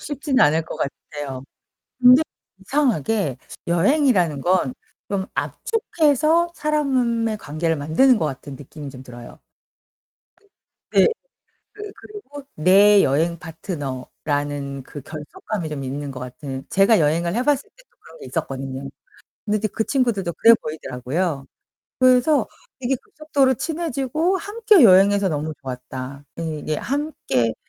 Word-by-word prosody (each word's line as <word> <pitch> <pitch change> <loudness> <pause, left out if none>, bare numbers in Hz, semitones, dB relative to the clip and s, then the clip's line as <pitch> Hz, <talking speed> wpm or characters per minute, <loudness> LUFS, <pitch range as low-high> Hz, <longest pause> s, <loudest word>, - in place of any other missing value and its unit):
쉽진 285 -2 -2
않을 155 +2 +4
것 - - -7
같아요. 140 -2 -6 0.6
근데 250 +4 +8 0.4
이상하게 210 - 0 0.3
여행이라는 180 - +2
건 175 -7 +1 0.4
좀 190 -1 -1
압축해서 330 - +1
사람의 255 -8 0
관계를 160 -1 -2
만드는 160 - +3
것 160 - 0
같은 140 0 -6
느낌이 145 +1 -9
좀 130 -1 -11
들어요. 120 -2 -12 1.5
네. - - +6 0.6
그 415 -1 -9
그리고 335 -10 -11
내 195 +5 +6
여행 165 +5 +1
파트너라는 145 -3 -4
그 145 +2 -10
결속감이 155 - -6
좀 145 -3 -5
있는 140 +2 -4
것 130 - -7
같은 130 +1 -7
제가 195 +3 +4
여행을 170 +4 +1
해봤을 275 +3 +2
때도 - - -24
그런 - - -16
게 435 - -10
있었거든요. 135 -3 -4 0.6
근데 210 0 0
이제 215 +1 -1
그 220 - -2
친구들도 230 -10 0
그래 230 +6 +6
보이더라고요. 145 +1 -3 0.5
그래서 255 +3 +4 0.3
이게 265 +1 0
급속도로 285 -4 0
친해지고 320 +3 -1
함께 415 -1 +3
여행해서 200 -1 +6
너무 155 +1 -3
좋았다. 130 +1 -7 0.2
예 160 -2 -3
이게 155 +1 -3
함께 240 - -1
185 Hz, 285 characters per minute, -22 LUFS, -, 1.5 s, 근데